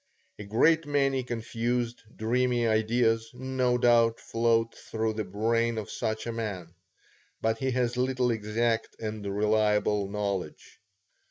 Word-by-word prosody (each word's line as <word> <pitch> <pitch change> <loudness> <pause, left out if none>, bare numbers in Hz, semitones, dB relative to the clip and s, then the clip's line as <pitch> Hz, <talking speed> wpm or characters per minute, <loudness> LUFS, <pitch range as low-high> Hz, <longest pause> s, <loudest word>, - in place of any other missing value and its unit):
A - - -5
great 150 +10 +3
many 135 -2 +1
confused, 120 0 -2
dreamy 120 +1 +1
ideas, 115 +1 +2
no 130 -1 0
doubt, 115 -1 +4
float 115 0 +1
through 110 0 -3
the 110 0 -2
brain 115 +4 0
of 110 - -5
such 110 -2 -3
a 120 - -2
man; 100 -7 -5 0.7
but 110 0 0
he 130 - 0
has 125 -1 0
little 130 -1 +1
exact 115 +1 -1
and 110 -1 -5
reliable 105 0 +1
knowledge. 100 -5 -4
115 Hz, 125 wpm, -28 LUFS, 110-120 Hz, 0.7 s, doubt